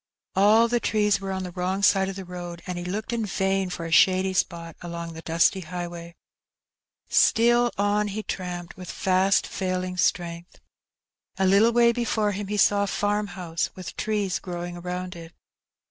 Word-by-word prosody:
All 215 +4 +5
the 240 +1 +1
trees 210 -3 +1
were 195 0 -4
on 190 0 -3
the 180 - -6
wrong 185 +2 -2
side 195 -1 +4
of 195 - -6
the 190 - -6
road^ 175 -1 -7
and 180 -2 -4
he 175 - -5
looked 205 +6 -4
in 230 -1 -1
vain 195 -2 0
for 170 -2 -5
a 165 - -5
shady 190 +2 +4
spot 170 -3 -2
along 170 -1 -6
the 160 - -9
dusty 165 +4 +2
highway. 170 -1 -7 0.9
Still 240 +1 +4
on 205 +1 +1
he 210 +2 -4
tramped, 175 -3 -5
with 185 -1 -9
fast 190 +1 +2
failing 185 -1 -3
strength. 170 0 -1 0.8
A 190 - +2
little 200 +5 +5
way 235 0 +5
before 225 -3 0
him 200 0 -4
he 210 +1 -2
saw 205 0 +4
a - - -5
farmhonsOj 195 -5 -2
with 185 -2 -8
trees 205 -4 -1
growing 175 -1 -6
around 180 +1 -5
it. 165 -1 -11
185 Hz, 175 wpm, -25 LUFS, 175-205 Hz, 0.9 s, All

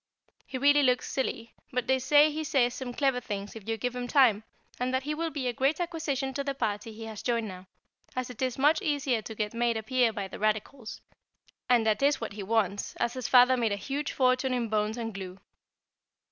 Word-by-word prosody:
He 260 - -4
really 285 +2 +5
looks 255 -2 +2
silly, 235 -3 -3 0.2
but 250 -1 -1
they 265 0 +2
say 295 +4 +5
he 310 +1 -3
says 250 -5 +2
some 255 -1 -5
clever 265 0 +1
things 205 -3 -5
if 225 -1 -9
you 225 - 0
give 245 +3 -3
him 245 0 -3
time, 245 -7 +4 0.4
and 250 +1 0
that 260 0 0
he 300 +2 -2
will 330 +2 -2
be 280 -5 -3
a 245 - 0
great 270 +7 +1
acquisition 300 -6 -2
to 280 +1 -2
the 275 -1 -3
party 220 -2 -2
he 225 +1 -9
has 220 -2 -7
joined 235 -2 0
now, 185 0 -10 0.5
as 255 -1 -3
it 245 - -11
is 255 -2 -1
much 295 +4 +3
easier 280 -6 0
to 220 - -8
get 210 0 -2
made 235 -1 +1
a 220 - -4
peer 250 0 +2
by 200 -2 -4
the - - -9
Radicals; 215 +3 -2 0.7
and 240 -3 +4
that 215 +1 +1
is 285 +1 +3
what 225 -3 -5
he 205 - -6
wants, 205 -1 -1
as 235 - -1
his 255 -3 -4
father 250 0 +6
made 230 -4 0
a - - 0
huge 275 +8 -3
fortune 255 0 +2
in 235 -2 -2
bones 215 +1 0
and 225 -2 -4
glue. 190 -1 -7
245 Hz, 230 wpm, -28 LUFS, 220-270 Hz, 0.7 s, father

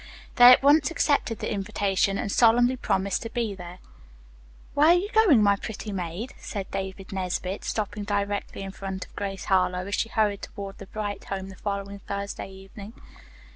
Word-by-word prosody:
They 245 - +8
at 255 - +6
once 295 +3 +5
accepted 285 -8 +1
the - - -3
invitation 195 -1 0
and 210 -2 -2
solemnly 240 +3 +4
promised 195 -5 -1
to 230 - -5
be 230 -3 -2
there. 180 -1 -9 1.0
"'Where 295 +2 +4
are 340 - +8
you 390 +4 -1
going, 405 - +5
my 200 -1 +5
pretty 215 +1 -6
maid?'" 185 +5 -4
said 200 -3 -6
David 190 0 -5
Nesbit, 185 0 -3
stopping 210 -1 -3
directly 205 -1 -2
in 195 - -6
front 190 -1 -6
of - - -22
Grace 195 -2 -4
Harlowe 185 -1 +1
as 200 - -6
she 225 - 0
hurried 210 -3 +1
toward 200 -1 -8
the 195 - -9
Bright 205 -1 -5
home 195 -1 -5
the 190 - -10
following 200 0 -4
Thursday 200 0 -5
evening. 195 +2 -11
200 Hz, 175 wpm, -26 LUFS, 195-225 Hz, 1.0 s, They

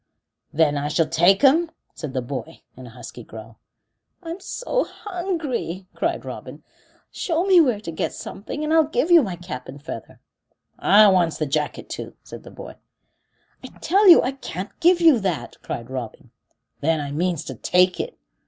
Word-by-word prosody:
"Then 150 -2 +2
I 145 - -2
shall 160 +2 +1
take 175 - +3
'em?" 320 +5 +5 0.2
said 150 -5 -7
the 130 - -1
boy, 125 -1 -7
in 130 -1 -11
a - - -10
husky 120 0 -11
growl. 110 +1 -12 0.6
"I'm 335 +2 -6
so - - -2
hungry," 325 - -4
cried - - -2
Robin. - - -9 0.5
"Show 335 -1 -1
me 375 -3 +6
where 250 -9 +1
to 170 - -6
get 160 - -2
something, 260 +9 -7
and 305 +1 0
I'll 320 -1 +5
give 315 +3 -1
you 340 -2 +8
my 195 -8 -3
cap 170 -8 -8
and 140 +2 -9
feather." 155 +4 -9 0.6
"I 210 +1 +6
wants 175 -4 +2
the 155 - -1
jacket 150 +1 -2
too," - - -7
said - - -10
the - - -13
boy. - - -11 0.9
"I - - -7
tell 395 +5 +3
you 345 - +9
I 255 - 0
can't 200 -8 -7
give 350 +1 +4
you 320 -8 +6
that," 190 -6 -3
cried 120 +2 -6
Robin. 125 -4 -7 0.5
"Then 160 +2 +1
I 145 -1 -4
means 170 +2 -1
to 130 - -6
take 180 +9 +2
it." - - -4
185 Hz, 180 wpm, -22 LUFS, -, 0.9 s, you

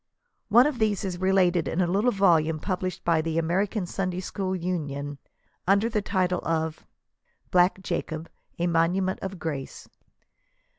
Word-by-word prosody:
One 240 +4 +7
of 295 -4 -1
these 215 -2 +1
is 180 -2 -4
related 185 -3 +3
in 165 - -2
a 180 - +4
little 200 +7 +2
volume 165 -7 +3
published 185 +1 -3
by 165 -2 +3
the 165 0 -2
American 190 +5 0
Sunday 180 0 -2
School 190 0 -3
Union, 145 -6 -3 0.5
under 200 +4 +3
the 215 -2 0
title 185 -2 0
of 160 -1 -2 0.6
"Black 180 +1 +3
Jacob, 165 -2 -3 0.3
a 170 - 0
Monument 175 +3 +1
of 190 0 -5
Grace." 150 -6 -5
180 Hz, 145 wpm, -26 LUFS, 165-195 Hz, 0.6 s, One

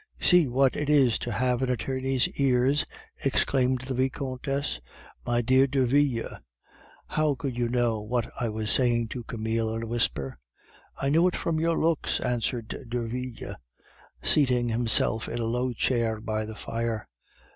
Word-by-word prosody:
"See 180 -4 +5
what 130 +1 +2
it 150 0 -2
is 135 -6 +4
to 120 - -4
have 125 +3 0
an 130 - 0
attorney's 130 +2 0
ears!" 135 +1 +2 0.4
exclaimed 130 -1 +2
the 135 0 -3
Vicomtesse. 130 - -2 0.5
"My 120 0 +1
dear 130 +3 +4
Derville, 135 -2 +1 0.7
how 155 -2 0
could 135 -4 -4
you 120 -1 0
know 120 -3 +1
what 120 +2 -1
I 120 - 0
was 110 0 -2
saying 120 -3 +2
to 120 - -5
Camille 110 0 -2
in 115 - -3
a - - -3
whisper?" 80 - -2 0.6
"I 135 - -1
knew 165 +5 +4
it 180 - -1
from 160 -1 -1
your 165 0 +1
looks," 165 -1 +1
answered 120 +1 -2
Derville, 120 +1 -4 0.7
seating 125 -5 +3
himself 115 -1 +2
in 120 - -4
a 115 - -1
low 125 +2 0
chair 115 -2 0
by 110 0 -2
the 110 0 -8
fire. 115 -1 -3
125 Hz, 155 wpm, -27 LUFS, 115-135 Hz, 0.7 s, See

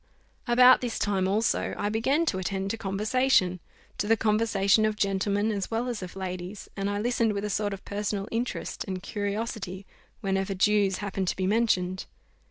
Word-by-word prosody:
About 250 +1 +7
this 245 -2 -2
time 195 -2 +1
also 215 +4 0
I 205 - -1
began 270 +9 +1
to 190 - 0
attend 190 +2 -2
to - - -2
conversation 205 -1 +2 0.4
to 205 - 0
the 225 +1 +4
conversation 215 -1 +3
of 215 -1 +1
gentlemen 200 +1 0
as 200 -2 -3
well 230 +2 -1
as 240 -4 -3
of 185 0 -7
ladies; 185 +1 -6
and 195 0 -2
I 205 - -1
listened 230 0 +1
with 200 0 -3
a 210 - -2
sort 205 +1 0
of 195 -1 -7
personal 205 0 -3
interest 235 +2 -3
and 185 -2 -5
curiosity 205 -2 -4 0.4
whenever 195 0 -1
Jews 200 0 +3
happened 195 -1 -2
to - - 0
be 190 - -1
mentioned. 190 -4 +1
205 Hz, 180 wpm, -27 LUFS, 195-220 Hz, 0.4 s, About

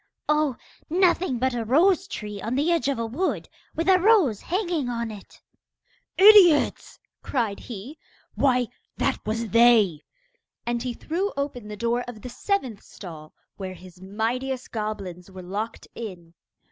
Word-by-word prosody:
'Oh, 300 -3 +2 0.3
nothing 355 -5 +2
but 260 +1 0
a 235 -1 -2
rose 350 - +3
tree 210 - -6
on 230 +3 -2
the 295 +5 +2
edge 335 -4 +1
of 280 - 0
a 230 - -2
wood, 285 +12 -2 0.3
with 330 - -2
a 375 -1 +6
rose 365 - +4
hanging 345 - -1
on 235 -2 -3
it.' 205 -2 -12 0.8
'Idiots!' 380 -6 +6 0.2
cried 225 -7 -2
he. 240 +7 -9 0.3
'Why, 250 -3 +2 0.3
that - - -1
was 225 +1 -2
they.' 220 -8 +5 0.6
And 240 0 -1
he 245 -1 -3
threw 370 +6 -2
open 275 -6 -3
the 210 0 -7
door 235 +2 0
of 220 -4 -9
the 250 - -6
seventh 255 - -2
stall, 155 -5 -11 0.2
where 190 -2 -6
his 180 0 -15
mightiest 240 +6 -3
goblins 200 -5 -5
were 190 -1 -10
locked 210 +5 -5
in. 180 -7 -8
240 Hz, 150 wpm, -25 LUFS, 210-300 Hz, 0.8 s, a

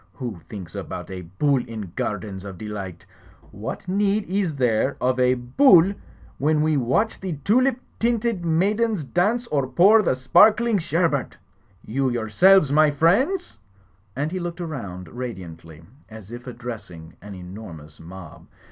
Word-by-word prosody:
Who 120 -9 -6
thinks 95 -6 -8
about - - -7
a 95 -1 -6
Bull 125 - 0
in 110 -6 -7
gardens 100 -2 -4
of 95 -2 -8
delight? 95 -4 -7 0.5
What 105 - -7
need 200 +2 +1
is 185 -4 -1
there 125 0 +1
of 130 0 0
a 125 0 +3
Bull 170 - +5 0.5
when 150 +2 +2
we 155 0 +2
watch 135 - 0
the 190 -3 -4
tulip 255 +4 +3 0.2
tinted 230 -4 0
maidens 200 +4 +1
dance 205 - 0
or 140 -3 0
pour 195 - +5
the 175 - +1
sparkling 215 - +4
sherbert? 165 -4 -1 0.5
You 130 +4 0
yourselves, 135 - +4
my 155 +1 +5
friends?" 205 - +1 0.6
And 145 +4 -2
he 185 - -3
looked 175 -1 -5
aroimd 100 - -6
ra 125 +1 -4
diantly, 80 -6 -11 0.3
as 110 -2 -12
if 120 +1 -9
addressing 110 -10 -8
an 100 0 -9
enormous 90 -5 -11
mob. 85 0 -12
130 Hz, 145 wpm, -23 LUFS, -, 0.6 s, Bull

